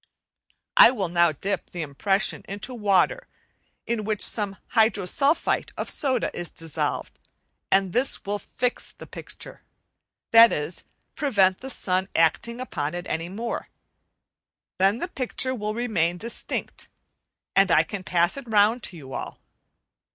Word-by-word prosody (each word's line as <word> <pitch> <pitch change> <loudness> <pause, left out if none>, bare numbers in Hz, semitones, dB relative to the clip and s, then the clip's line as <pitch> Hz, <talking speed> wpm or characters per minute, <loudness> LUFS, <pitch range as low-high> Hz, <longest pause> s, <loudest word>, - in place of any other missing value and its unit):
I - - +10
will 205 -8 -2
now 170 -1 +3
dip 195 +7 -3
the 175 -2 -4
impression 195 +8 0
into 205 +6 -4
water 220 - +1 0.6
in 230 -2 -1
which 215 -1 0
some 205 -3 +1 0.2
hyposulphite 225 - +2
of - - -3
soda 260 -5 0
is 175 - -3
dissolved, 165 -3 -3 0.5
and 190 -2 +2
this 255 -1 +2
will 205 +1 -2
"fix" 245 +4 -2
the - - -12
picture, - - -10 0.7
that 230 0 +9
is, 150 +4 -4 0.3
prevent 195 -10 +2
the 265 - -7
sun 185 -6 0
acting 200 +9 +1
upon 155 - -3
it 175 0 -5
any 165 +2 -3
more; 230 +5 -4 1.1
then 195 +3 +4
the 345 - -3
picture 260 -4 -2
will 215 -3 -3
remain 180 -8 0
distinct, 230 +5 -5 0.7
and 195 -2 +4
I 160 -1 +5
can 190 +3 -6
pass 175 +4 +1
it 275 -3 -8
round 215 +3 +4
to 180 - -7
you 135 -4 -10
all. - - -6
200 Hz, 140 wpm, -25 LUFS, 175-235 Hz, 1.1 s, I